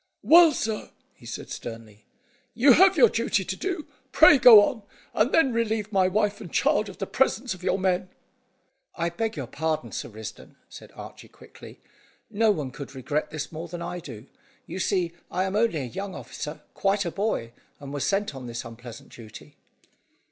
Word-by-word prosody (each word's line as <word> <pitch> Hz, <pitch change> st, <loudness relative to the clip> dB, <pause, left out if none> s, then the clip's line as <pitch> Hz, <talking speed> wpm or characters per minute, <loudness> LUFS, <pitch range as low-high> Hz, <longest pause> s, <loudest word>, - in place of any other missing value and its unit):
"Well, 335 Hz, 0 st, +7 dB
sir," 220 Hz, -6 st, -3 dB, 0.2 s
he -, -, -16 dB
said -, -, -7 dB
sternly, 115 Hz, -2 st, -9 dB, 0.5 s
"you 260 Hz, +4 st, +6 dB
have 380 Hz, +3 st, +5 dB
your 245 Hz, -5 st, +7 dB
duty 225 Hz, -3 st, -1 dB
to 190 Hz, -, -3 dB
do; 360 Hz, -, -4 dB, 0.3 s
pray 295 Hz, -3 st, +7 dB
go 235 Hz, -5 st, +9 dB
on, 225 Hz, +1 st, -2 dB, 0.3 s
and 235 Hz, +6 st, +2 dB
then 270 Hz, -7 st, +3 dB
relieve 220 Hz, -2 st, -1 dB
my 190 Hz, -2 st, +3 dB
wife 205 Hz, +1 st, 0 dB
and 180 Hz, -, -9 dB
child 210 Hz, 0 st, +1 dB
of 190 Hz, -, -11 dB
the 195 Hz, -, -3 dB
presence 250 Hz, 0 st, 0 dB
of 185 Hz, -, -13 dB
your 185 Hz, -, 0 dB
men." 185 Hz, -1 st, 0 dB, 0.9 s
"I 170 Hz, 0 st, -1 dB
beg 220 Hz, +2 st, -3 dB
your 140 Hz, -, -4 dB
pardon, 155 Hz, -2 st, -3 dB
Sir -, -, -5 dB
Risdon," 110 Hz, -1 st, -10 dB
said -, -, -13 dB
Archy -, -, -11 dB
quickly. -, -, -15 dB, 0.5 s
"No 220 Hz, +1 st, +2 dB
one 150 Hz, -10 st, -1 dB
could 140 Hz, +1 st, -9 dB
regret 145 Hz, +4 st, -2 dB
this 155 Hz, -1 st, -6 dB
more 165 Hz, +1 st, -7 dB
than 170 Hz, +1 st, -7 dB
I 175 Hz, +1 st, -5 dB
do. 120 Hz, -10 st, -10 dB, 0.4 s
You 190 Hz, -, -7 dB
see 185 Hz, -3 st, 0 dB, 0.2 s
I 185 Hz, +2 st, -1 dB
am 190 Hz, +1 st, -3 dB
only 210 Hz, -8 st, +1 dB
a -, -, -4 dB
young 190 Hz, -, -6 dB
officer, 150 Hz, +1 st, -7 dB
quite 195 Hz, 0 st, 0 dB
a 170 Hz, -, -2 dB
boy, 195 Hz, -, -2 dB, 0.3 s
and 140 Hz, -1 st, -9 dB
was 145 Hz, -, -3 dB
sent 200 Hz, -3 st, 0 dB
on 130 Hz, -2 st, -8 dB
this 120 Hz, 0 st, -6 dB
unpleasant 115 Hz, 0 st, -11 dB
duty." 110 Hz, -3 st, -13 dB
190 Hz, 185 wpm, -25 LUFS, 145-220 Hz, 0.9 s, go